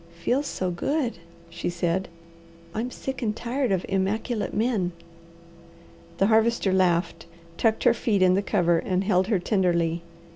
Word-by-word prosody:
"Feels 250 +12 0
so 185 -1 -2
good," 245 - -1 0.3
she 170 +1 -4
said. 175 +2 -1 0.7
"I'm 230 +3 -2
sick 265 +1 -6
and 215 -3 -1
tired 250 +1 -1
of 185 -2 0
immaculate 205 +4 -1
men." 210 -6 0 1.2
The 195 - +3
Harvester 220 -2 +3
laughed, 180 -3 +1 0.3
tucked 220 +4 +1
her 245 - +5
feet 210 -5 +1
in 185 0 +5
the 195 - +2
cover 175 -4 +2
and 185 +2 -1
held 190 -2 +2
her 215 -3 +2
tenderly. 175 -3 +1
195 Hz, 145 wpm, -25 LUFS, 180-230 Hz, 1.2 s, her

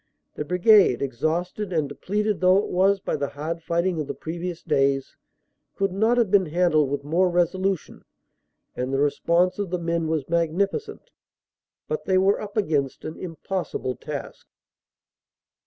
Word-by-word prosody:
The - - -4
Brigade, 180 - +5
exhausted 170 - -2
and 155 -4 0
depleted 205 +8 -2
though 185 +1 +5
it 200 - 0
was 195 +2 +3
by - - -2
the 140 - -2
hard 160 +4 -5
fighting 170 +1 0
of 145 - -5
the - - -4
previous 170 +1 -5
days, 140 -3 +1 0.6
could 195 -1 0
not 220 +6 +2
have 230 -6 +2
been 190 -3 +4
handled 155 -3 +2
with 140 0 -3
more 175 +5 +2
resolution, 185 +1 -1 0.7
and 125 +1 -3
the 135 - 0
response 170 +6 +1
of 200 -3 -2
the 180 - -1
men 170 -1 -1
was 155 -4 -1
magnificent, 175 - -1 0.8
but 465 - -3
they 190 -1 +2
were 195 +2 +3
up 210 0 -7
against 150 -9 0
an 155 - -5
impossible 170 -6 -4
task. - - -7
175 Hz, 155 wpm, -24 LUFS, 155-195 Hz, 0.8 s, Brigade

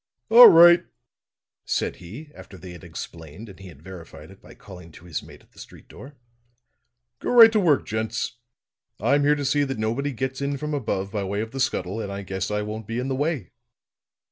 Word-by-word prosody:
"All 240 +2 +10
right," 170 +1 +7 0.8
said - - -3
he, 120 - -12
after 95 - -14
they 90 +1 -11
had 90 +2 -13
explained 85 +4 -10
and 95 - -15
he 95 - -12
had 75 -4 -16
verified 90 -3 -12
it - - -18
by - - -16
calling 90 -4 -14
to 85 - -16
his 85 -4 -5
mate - - -16
at - - -30
the - - -19
street - - -14
door. 140 +3 -14 1.0
"Go - - -5
right 230 -2 +8
to 220 - +1
work, 160 -8 +2
gents. 110 +2 -4 0.6
I'm 140 +6 +1
here 145 +1 +3
to 145 -1 -5
see 145 +2 +1
that 135 -3 -4
nobody 115 +7 -2
gets 130 +1 -5
in 140 0 -2
from 150 +2 -5
above 100 -8 -3
by 105 -1 -3
way 100 +2 -3
of 110 0 -6
the 135 - -7
scuttle, 105 -5 -2
and 100 - -6
I 100 0 -6
guess 95 0 -5
I 105 0 -2
won't 105 0 -7
be 115 - -5
in 125 +2 -3
the 135 - -2
way." 145 - -3
110 Hz, 215 wpm, -23 LUFS, 95-140 Hz, 1.0 s, All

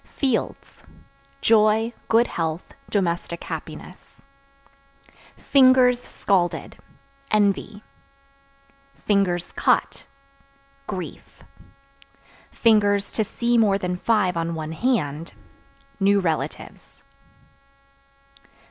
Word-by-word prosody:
Fields 265 -5 -3 0.6
Joy, 220 +1 +3
good 230 +2 +4
health, 165 -3 -4 0.2
domestic 170 -3 -2
happiness. - - -9 1.1
Fingers 255 -2 +4
(Scalded) 185 -7 -1 0.5
envy; 205 0 0 1.7
(cut) - - 0 0.8
grief; 185 -2 -8 1.2
(to 205 -1 +3
see 235 +3 0
more 205 -3 +3
than 180 -2 -3
five 190 -2 +1
on 165 0 -2
one 155 -1 -5
hand) 165 - -2 0.7
new 200 +1 +3
relatives. 165 -5 -5
205 Hz, 65 wpm, -23 LUFS, 175-230 Hz, 1.7 s, good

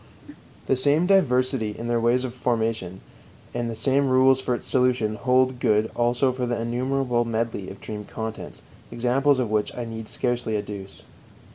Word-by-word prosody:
The 135 - +2
same 145 +6 +3
diversity 130 - +2
in 115 - -5
their 120 -1 +1
ways 120 +2 +2
of 125 -2 -4
formation 110 -7 -2 0.5
and 120 -1 -2
the 115 - -4
same 135 +4 +1
rules 130 +1 +4
for 125 -1 0
its - - -8
solution 125 -4 +1
hold 130 +2 +1
good 110 -1 +2
also 120 +2 +2
for 125 -1 -3
the 120 -1 -1
innumerable 125 +1 0
medley 115 -4 -3
of 95 - -10
dream 105 -1 -6
contents, 110 +1 -7 0.3
examples 130 +4 +2
of 120 -4 -1
which 105 -1 0
I 120 - -3
need 115 -1 -7
scarcely 120 -3 -1
adduce. 100 -2 -7
120 Hz, 165 wpm, -24 LUFS, 110-130 Hz, 0.5 s, rules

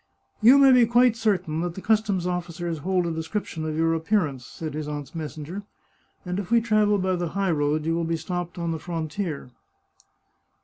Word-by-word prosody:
" - - -41
You 265 +3 +9
may 275 -1 +7
be 250 -2 +6
quite 240 0 +4
certain 185 -8 0
that 175 -1 -3
the - - -6
customs 210 -4 +1
officers 175 -2 -3
hold 180 +3 0
a 170 - -1
description 160 0 -4
of 155 0 -3
your 165 0 +2
appearance," 160 - 0
said 155 -3 -6
his 155 0 -4
aunt's 145 -1 -6
messenger, 160 +3 -6 0.3
" - - -40
and 180 +1 -2
if 200 - -5
we 235 0 +5
travel 215 -2 +2
by 185 -1 0
the 175 -1 -2
high 195 -2 +1
road 150 0 0
you 165 - +1
will 170 0 0
be 165 0 -1
stopped 175 +2 -4
on 170 -1 -2
the 160 - -3
frontier." 165 -3 -4
175 Hz, 205 wpm, -25 LUFS, 160-205 Hz, 0.3 s, You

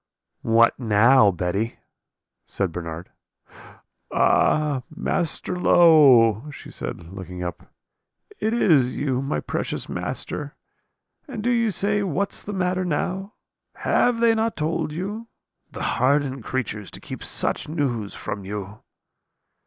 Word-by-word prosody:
"'What 115 +2 +3
now, 115 0 +5
Betty?' 95 +5 -2 0.7
said 95 -3 -2
Bernard. 85 0 -7 1.0
"'Ah, 150 -4 +2
Master 165 +3 -2
Low!' 140 - +6
she - - -11
said, 85 +1 -7
looking 90 -2 -7
up, 90 - -7 0.7
'is 170 - +3
it - - -6
you, 130 -3 0
my 135 +2 -2
precious - - -3
master, - - -5 0.7
and 230 -7 -6
do 245 - +2
you 230 -2 +2
say, 205 +2 0
what's 195 +1 0
the 205 - -7
matter 185 -1 0
now? 185 +4 -2 0.4
Have 245 -2 +1
not 225 -1 +2
they - - -10
told 155 0 -1
you? 205 +8 -5 0.4
The - - -7 0.2
hardened 135 -1 +1
creatures 110 -6 -3
to - - -9
keep - - -8
such - - -2
news 125 -10 -2
from 100 - -5
you!' 100 +1 -6
140 Hz, 120 wpm, -23 LUFS, -, 1.0 s, Low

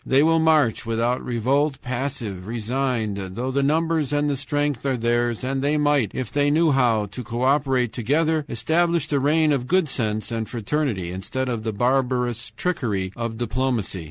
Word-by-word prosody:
THEY 135 +2 +3
WILL 165 +1 +4
MARCH 155 -7 +3
WITHOUT 115 +2 0
REVOLT, 135 +4 0
PASSIVE, 120 -7 -4
RESIGNED 110 -5 -2
THOUGH 125 +3 -2
THE 140 +1 +1
NUMBERS 155 0 +1
AND 145 0 +1
THE - - 0
STRENGTH 145 -1 -1
ARE 135 -2 0
THEIRS, 120 0 0
AND 135 +1 -1
THEY 145 +2 +1
MIGHT, 145 -7 +2
IF 130 -3 -3
THEY 145 0 +2
KNEW 160 +2 +3
HOW 120 -6 +2
TO 105 +6 -8
CO 120 +2 -3
OPERATE 130 -3 +2
TOGETHER, 155 +6 +1
ESTABLISH 160 +6 +1
THE 145 - +1
REIGN 155 +3 +3
OF 130 -3 0
GOOD 185 0 +2
SENSE 110 -4 -2
AND 115 -1 -3
FRATERNITY, 115 - -2
instead 95 +8 -3
of 120 -3 -2
the 110 0 -2
barbarous 125 0 0
trickery 110 - -1
of 115 -1 -4
diplomacy. 120 -4 -1
130 Hz, 175 wpm, -23 LUFS, 115-145 Hz, -, WILL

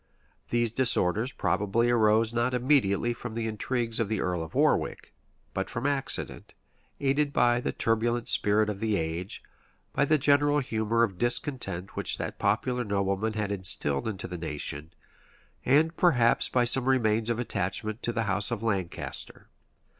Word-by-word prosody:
These 120 -1 +1
disorders 115 -1 +2
probably 110 +2 0
arose 110 0 +3
not 120 +2 0
immediately 120 -4 +2
from 120 -1 -8
the 115 -1 -2
intrigues 115 +1 -2
of 115 -3 0
the 110 -2 -1
earl 90 -2 -1
of 80 -1 -8
Warwick, - - +1 0.4
but - - -3
from 115 +3 -4
accident, 140 -2 -2 0.4
aided 140 +1 +1
by 120 -2 +3
the - - -2
turbulent 115 +1 0
spirit 105 +1 +2
of 105 -2 -4
the 110 -1 0
age, 85 +4 -4 0.5
by 145 - +2
the 155 +2 +3
general 145 +1 +3
humor 115 -3 0
of 95 -6 -2
discontent 120 -7 -2
which - - +1
that - - -5
popular 125 +5 0
nobleman 100 +1 -1
had 105 -2 -2
instilled 85 -7 0
into 100 -3 -4
the 90 - -6
nation, 75 -1 -3 0.7
and 155 +5 +3
perhaps 125 -10 +3
by 125 - +2
some 125 +1 +2
remains 115 -4 +2
of 120 - 0
attachment 110 0 -2
to 120 - -1
the 115 -1 -1
house 100 -1 +1
of 115 -2 -4
Lancaster. 95 -6 -4
115 Hz, 155 wpm, -28 LUFS, 100-125 Hz, 0.7 s, arose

